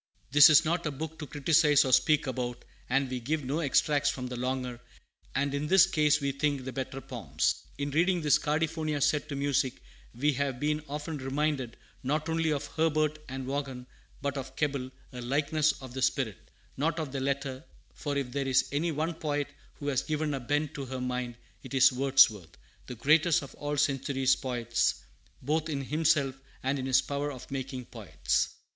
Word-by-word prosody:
"This 145 +3 +9
is 155 +1 +6
not 170 +2 0
a - - -1
book 160 +3 -6
to 150 - -6
criticise 145 0 +4
or 130 - +1
speak 150 +3 +4
about, 125 -2 -4 0.2
and 135 +2 +2
we 125 0 -3
give 145 +4 -2
no 140 +5 -1
extracts 145 -1 +2
from 125 - -4
the 125 0 -5
longer, 125 -1 -3 0.6
and 140 0 0
in 145 +1 -1
this 190 +1 +7
case, 150 -5 +3
we 140 -1 -1
think, 140 -1 -1
the 130 - -5
better 135 +1 -4
poems. 85 - -2
In 140 0 -2
reading 175 +4 +2
this 150 -2 +4
Cardiphonia 155 0 -1
set 150 0 +1
to 145 - -3
music, 140 -1 0 0.4
we 145 +5 +2
have 135 -2 -2
been 150 +1 0
often 150 +2 -4
reminded, 135 -2 -1 0.2
not 150 +4 -1
only 165 -1 +1
of 145 -1 -1
Herbert 155 -1 0
and 130 0 -5
Vaughan, 135 -2 -4 0.4
but 140 0 -1
of 135 0 -6
Keble, 140 -4 -1 0.2
a 125 - -6
likeness 150 +4 +1
of 130 -2 -9
the 130 - -4
spirit, 125 - -1 0.3
not 160 +4 0
of 155 -4 -3
the 135 - -3
letter; 135 -1 -2 0.3
for 145 -2 -3
if 135 -3 -2
there 135 +1 -2
is 130 0 +3
any 160 +4 0
one 160 +3 -1
poet 145 -3 -2 0.3
who 145 - -9
has 135 -3 +1
given 155 -1 -2
a 135 - -2
bent 145 +4 -1
to 140 -3 -5
her 130 0 -5
mind, 125 -1 -3 0.3
it 130 0 -7
is 130 0 +7
Wordsworth, 130 -9 +3 0.3
the 125 - -6
greatest 150 +6 +3
of 140 - -10
all 145 - -6
our 145 - -1
century's 135 -1 +2
poets, 120 -3 -1 0.4
both 155 +3 0
in 140 -3 -2
himself 150 -2 +2 0.3
and 135 +2 0
in 130 - -3
his 135 0 +4
power 145 +1 -2
of 130 -1 -10
making 130 -2 -4
poets." - - -1
140 Hz, 190 wpm, -29 LUFS, 130-150 Hz, 0.6 s, This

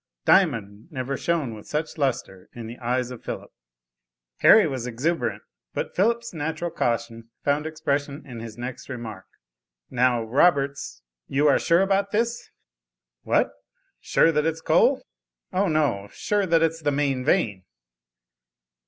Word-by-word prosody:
Diamond 115 - +2
never 135 -1 -3
shone 150 -5 -1
with 105 -1 -11
such 150 +1 -3
lustre 120 -9 -2
in 120 -1 -7
the 115 +2 -9
eyes 125 +1 -1
of 125 - -9
Philip. - - -6 0.9
Harry 220 -1 +7
was 130 -5 -3
exuberant, 145 +9 -1 0.3
but - - -3
Philip's 235 +3 +1
natural 160 +2 -3
caution 115 -1 -2
found 145 +2 +1
expression 145 -1 -2
in 125 -4 -8
his 115 -1 -8
next 125 +2 -7
remark. 115 -7 -7 0.6
"Now, 125 -1 +2
Roberts, 140 - +1 0.2
you 145 +2 +2
are 140 - +5
sure 170 +2 +3
about 195 +1 +2
this?" 230 +3 -1 0.7
"What - - +2 0.5
sure 165 - +3
that 150 0 +1
it's 160 0 -1
coal?" - - +3 0.5
"O, 195 +2 +2
no, 145 - +1
sure 205 -2 0
that 165 -1 +4
it's 165 0 0
the 150 - +1
main 140 -2 0
vein." 115 - +1
140 Hz, 140 wpm, -25 LUFS, 120-165 Hz, 0.9 s, Harry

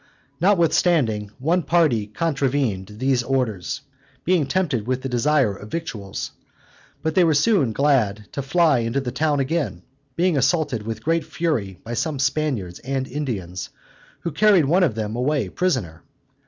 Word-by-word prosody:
Notwithstanding, 165 - +2
one 165 +7 +1
party 150 -10 +2
contravened 130 - -1
these 130 +1 +2
orders, 125 -3 -2 0.4
being 170 -5 +2
tempted 140 - 0
with 130 0 -1
the 135 - -2
desire 125 -3 +2
of 105 +2 -11
victuals: 110 - -5 0.7
but 160 0 0
they 185 - +5
were 160 -3 +3
soon 150 - +3
glad 110 -6 +1
to 140 - -3
fly 150 0 +3
into 115 +3 -1
the 130 -3 -3
town 145 +2 +1
again, 145 +3 -1 0.3
being 175 -2 +2
assaulted 130 -5 +1
with 115 - -5
great 165 +1 +1
fury 140 - -2
by 115 - -6
some 155 +4 -1
Spaniards 130 - -1
and 130 0 -3
Indians, 105 - -4 0.5
who 170 - -3
carried 190 0 +4
one 170 +7 +3
of 155 -12 +2
them 110 0 -3
away 135 +3 0
prisoner. 120 - -1
135 Hz, 150 wpm, -22 LUFS, 115-160 Hz, 0.7 s, they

